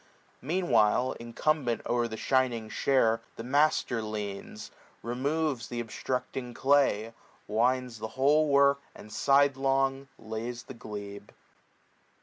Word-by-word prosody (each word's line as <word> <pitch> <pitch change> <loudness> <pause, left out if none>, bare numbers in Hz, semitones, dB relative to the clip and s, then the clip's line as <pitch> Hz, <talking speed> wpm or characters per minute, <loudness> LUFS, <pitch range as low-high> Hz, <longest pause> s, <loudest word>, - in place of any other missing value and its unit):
40 - - -13
Meanwhile 130 - +2
incumbent 120 +1 -1
o'er 120 -1 +1
the 110 -1 -6
shining 125 -4 0
share 115 -4 +2
The 115 - -7
master 140 -2 +2
leans, 105 -2 -6 0.3
removes 135 +1 -1
th' 120 - -5
obstructing 125 +1 -4
clay. 130 -6 +2 0.3
Winds 125 +2 0
the 110 - -4
whole 150 +3 +4
work, 140 0 +4
and 105 - -12
sidelong 135 -1 +2
lays 115 +2 -5
the 135 - -10
glebe. 100 -3 -8
125 Hz, 115 wpm, -29 LUFS, 110-140 Hz, 0.3 s, whole